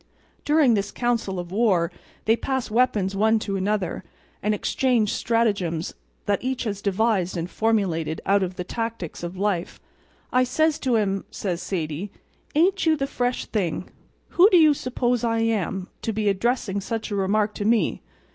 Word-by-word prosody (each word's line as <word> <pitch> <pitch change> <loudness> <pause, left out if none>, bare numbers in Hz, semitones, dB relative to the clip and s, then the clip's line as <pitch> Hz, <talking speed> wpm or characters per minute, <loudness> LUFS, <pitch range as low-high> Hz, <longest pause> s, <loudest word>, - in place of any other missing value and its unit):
During 295 -5 +4
this 200 -1 0
council 235 -6 -1
of 175 -1 -5
war 190 -5 +2 0.3
they 225 - +4
pass 260 0 -3
weapons 215 -5 +2
one 220 +3 +3
to 205 -2 -3
another, 195 -1 -1 0.4
and 210 +1 +1
exchange 235 -1 +1
stratagems 200 -8 0 0.3
that 205 +2 0
each 260 0 -1
has 205 -4 -3
devised 200 -3 +1
and 170 0 -2
formulated 180 -8 0
out 200 +1 +3
of 185 -1 -2
the 180 - -4
tactics 225 -4 -4
of 175 +2 -6
life. 190 -3 -1 0.5
"I 255 0 +5
says 310 +5 +1
to 250 -4 +1
'im," 195 -2 0
says 180 -4 -3
Sadie, 165 +1 -3 0.5
"ain't 370 +5 +3
you 315 -1 +4
the 275 - 0
fresh 250 -2 -2
thing! 185 -5 -2 0.4
Who 370 +4 +6
do 365 - +6
you 310 -3 +6
suppose 245 -3 -1
I 230 -1 +1
am, 195 -4 -1
to 225 - -1
be 215 -1 0
addressing 200 0 0
such 225 +2 -4
a - - -1
remark 205 +2 +1
to - - -4
me? 225 0 +2
215 Hz, 165 wpm, -24 LUFS, 190-240 Hz, 0.5 s, Who